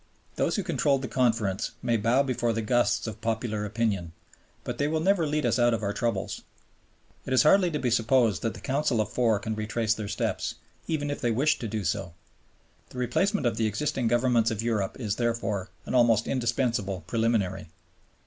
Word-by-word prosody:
Those - - 0
who 200 - -1
controlled 140 -5 +1
the - - -2
Conference 115 -6 0
may 120 - +1
bow 115 +5 +3
before 120 -3 0
the 115 0 -2
gusts 120 +3 +1
of 110 -1 -6
popular 110 -2 -2
opinion, 100 -6 -1 0.5
but - - -5
they 145 - +2
will 160 +1 0
never 175 -1 +2
lead 150 -1 0
us 120 +1 +1
out 120 -1 +4
of 110 - -5
our 100 0 -1
troubles. 115 -5 -2 0.9
It 130 - -1
is 130 - +5
hardly 180 +4 +5
to 155 - -2
be 125 -4 -1
supposed 115 -5 +2
that 115 - -2
the - - -10
Council 135 -3 0
of 105 -1 -1
Four 115 -4 +2
can 110 +2 -4
retrace 110 +1 0
their 110 -2 -5
steps, 100 - -2 0.3
even 145 -3 -1
if 145 - -5
they 120 - +1
wished 140 +7 +1
to 115 - -3
do 110 -1 -3
so. 95 -3 -2 0.7
The - - -12
replacement 145 - 0
of 115 -2 +1
the 110 - +1
existing 120 +3 -1
Governments 120 -1 +3
of 110 -1 -3
Europe 110 -3 -1
is, 105 -4 -2
therefore, 115 -5 -1 0.2
an - - -5
almost 120 -3 +4
indispensable 115 -6 -1
preliminary. 115 -4 0
115 Hz, 195 wpm, -27 LUFS, 110-130 Hz, 0.9 s, is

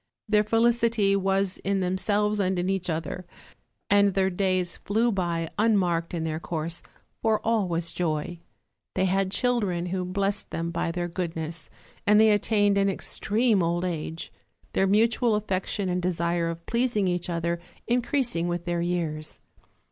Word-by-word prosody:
Their 210 -1 +4
felicity 230 -2 +3
was 195 -1 0
in 195 0 0
themselves 205 +3 0
and 190 -1 +1
in 180 +2 0
each 190 -1 -2
other, 165 +3 -3 0.6
and 200 -1 +4
their 190 -1 +2
days 185 -1 0
flew 225 +4 +1
by 170 -4 -1
unmarked 180 -6 +2
in 165 - -2
their 160 -1 -2
course, 165 0 -3 0.4
for 220 -1 +2
all 220 -4 +2
was 170 -1 -2
joy. 165 0 -2 0.6
They 190 - +2
had 190 +1 +1
children, 200 -5 0
who 185 +1 -2
blessed 195 +2 -1
them 165 0 -3
by 170 - -1
their 175 +1 -2
good 175 -1 -3
ness, 160 0 -5 0.4
and 210 +1 +6
they 220 0 +6
attained 205 -1 +3
an 195 0 +3
extreme 215 +2 +1
old 170 +1 0
age: 165 -1 -4 0.4
their 195 - +2
mutual 225 +3 +3
affection 195 -1 -2
and 180 0 0
desire 170 -1 0
of 165 0 -6
pleasing 235 -4 +1
each 175 0 -1
other 170 0 -1 0.3
increasing 240 -7 +1
with 175 0 -3
their 175 -1 -1
years. 165 -3 -2
185 Hz, 155 wpm, -26 LUFS, 170-210 Hz, 0.6 s, and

